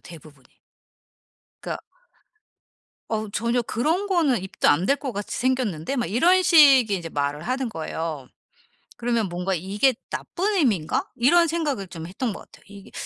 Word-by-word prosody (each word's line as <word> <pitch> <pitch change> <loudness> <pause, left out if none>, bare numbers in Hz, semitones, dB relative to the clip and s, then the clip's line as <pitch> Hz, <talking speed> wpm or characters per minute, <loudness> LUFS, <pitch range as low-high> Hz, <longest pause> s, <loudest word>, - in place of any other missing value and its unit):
대부분이. 155 -5 -14 1.2
그러니까 - - -5 1.3
"어우 215 -2 -3
전혀 235 +4 0
그런 315 - -1
거는 310 - +1
입도 190 - 0
안 170 +6 +3
댈 280 - +3
것 275 -4 -5
같이 205 0 -5
생겼는데?" 250 - -1
막 240 - -1
이런 345 - +3
식의 275 - +6
이제 170 - -7
말을 145 +1 -2
하는 255 0 -2
거예요. 160 - -5 0.7
그러면 235 -3 -1
뭔가 180 +2 -2
'이게 205 +10 +1 0.2
나쁜 405 +4 -2
의미인가?' 215 - +1
이런 335 +8 +4
생각을 295 - -2
좀 165 -2 -8
했던 220 +6 -3
것 - - -9
같아요. - - -18
이게 200 -1 -13
230 Hz, 315 characters per minute, -24 LUFS, 180-275 Hz, 1.3 s, 식의